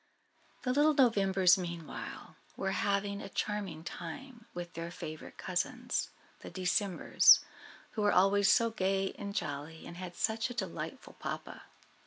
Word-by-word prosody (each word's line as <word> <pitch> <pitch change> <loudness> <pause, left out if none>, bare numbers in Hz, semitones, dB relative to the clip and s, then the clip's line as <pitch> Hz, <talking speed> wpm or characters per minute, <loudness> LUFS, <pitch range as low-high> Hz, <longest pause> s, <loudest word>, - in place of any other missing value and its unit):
The 250 - +1
little 295 +2 +4
Novembers, 195 -7 +5
meanwhile, 170 -3 -6 0.2
were 195 - -1
having 200 +1 0
a - - -7
charming 205 -6 -3
time 230 +9 -8
with 175 0 -7
their 165 +1 -5
favourite 155 -2 -8
cousins, 245 +7 -2 0.3
the - - -9
Decembers, 185 0 +5 0.5
who 215 - -3
were 205 0 +4
always 195 +2 +4
so 230 -2 +4
gay 195 -2 0
and 200 0 -5
jolly, 155 -2 -4
and 170 - -9
had 180 -1 -7
such 220 +2 0
a 245 - -7
delightful 190 - -5
papa. - - -6
195 Hz, 140 wpm, -32 LUFS, 175-220 Hz, 0.5 s, Novembers